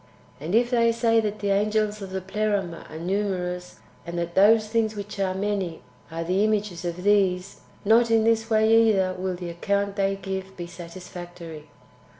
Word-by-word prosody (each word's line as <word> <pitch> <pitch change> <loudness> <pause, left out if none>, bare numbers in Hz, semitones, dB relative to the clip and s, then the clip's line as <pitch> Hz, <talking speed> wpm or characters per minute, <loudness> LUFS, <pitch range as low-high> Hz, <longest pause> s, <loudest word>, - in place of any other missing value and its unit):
And 160 +8 -2
if 240 +2 +3
they 230 -1 +4
say 230 0 +2
that 215 -1 -2
the 200 -1 0
angels 210 +1 +1
of 195 - -6
the 190 0 -4
Pleroma 195 -3 -2
are 155 - -8
numerous, 180 0 -2 0.3
and 170 +1 -6
that 170 0 -3
those 215 +3 +5
things 220 -1 0
which 205 0 -7
are 190 -1 0
many 190 -7 -2 0.3
are 165 0 -4
the 185 +4 +1
images 210 -5 -1
of 175 +1 -4
these 195 -2 +2
— - - -28
not 230 +3 +5
in 225 -1 +4
this 225 0 +2
way 225 +1 +5
either 190 -4 +2
will 185 0 -3
the 175 -1 -6
account 200 +3 -1
they 195 0 +1
give 190 0 -6
be 175 - -5
satisfactory. 170 -2 -10
195 Hz, 180 wpm, -25 LUFS, 180-215 Hz, 0.3 s, those